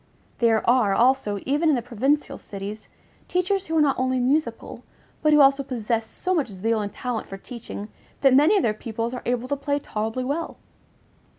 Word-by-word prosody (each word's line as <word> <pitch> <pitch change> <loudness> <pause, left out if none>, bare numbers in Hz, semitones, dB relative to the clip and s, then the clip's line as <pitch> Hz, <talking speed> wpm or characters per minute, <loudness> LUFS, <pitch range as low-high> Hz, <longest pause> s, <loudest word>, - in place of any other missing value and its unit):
There 230 -3 +2
are, 235 -5 +4
also, 240 -4 +2
even 295 +4 +2
in 300 - +4
the 245 - -1
provincial 270 +5 0
cities, 205 +2 -7 0.4
teachers 370 +2 0
who 320 0 0
are - - +5
not 280 -3 +2
only 255 0 +1
musical, 285 +6 -1 0.4
but 305 - +3
who 300 -1 +6
also 275 0 +5
possess 230 -4 -2
so 370 +10 -2
much 315 -6 +1
zeal 215 +2 -1
and 205 -1 -4
talent 245 0 -4
for 195 - -7
teaching 210 -1 -8 0.3
that 270 -2 +5
many 300 +10 +5
of 385 - +1
their 215 - +2
pupils 230 +2 -4
are 250 - -5
able 245 0 -1
to 285 - 0
play 285 +1 -1
tolerably 225 -2 -3
well. 295 +6 -3
255 Hz, 190 wpm, -24 LUFS, 225-285 Hz, 0.4 s, who